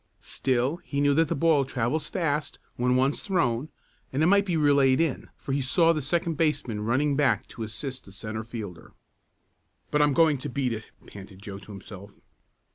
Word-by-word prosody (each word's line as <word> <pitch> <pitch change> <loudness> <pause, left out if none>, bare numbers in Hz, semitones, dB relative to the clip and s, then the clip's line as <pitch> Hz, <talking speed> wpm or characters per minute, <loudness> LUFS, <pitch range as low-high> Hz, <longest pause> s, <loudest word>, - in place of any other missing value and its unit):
Still 130 +4 0
he 140 -4 -4
knew 145 0 +4
that 160 +2 +3
the - - -1
ball 155 -1 +3
travels 130 +4 -1
fast 150 -5 -1 0.2
when 125 +1 +1
once 135 +3 +2
thrown, 150 - 0 0.4
and 140 +4 +1
it - - +5
might 200 +3 +4
be 175 -3 +1
relayed 140 -3 +4
in, 165 -5 -1
for - - -6
he 140 +1 +1
saw 165 +5 +3
the 155 - -2
second 165 +2 -1
baseman 140 -9 0
running 135 +6 +1
back 130 -5 +2
to 115 - -10
assist 125 +5 -5
the 100 - -13
centre 110 +3 -5
fielder. 110 -7 -8 1.0
"But 150 - +3
I'm 145 -1 +4
going 155 -2 +4
to 145 - -5
beat 130 -2 -1
it!" 110 0 -7 0.2
panted 95 -1 -12
Joe 100 -1 -7
to 105 - -13
himself. 100 0 -10
135 Hz, 190 wpm, -27 LUFS, 115-150 Hz, 1.0 s, it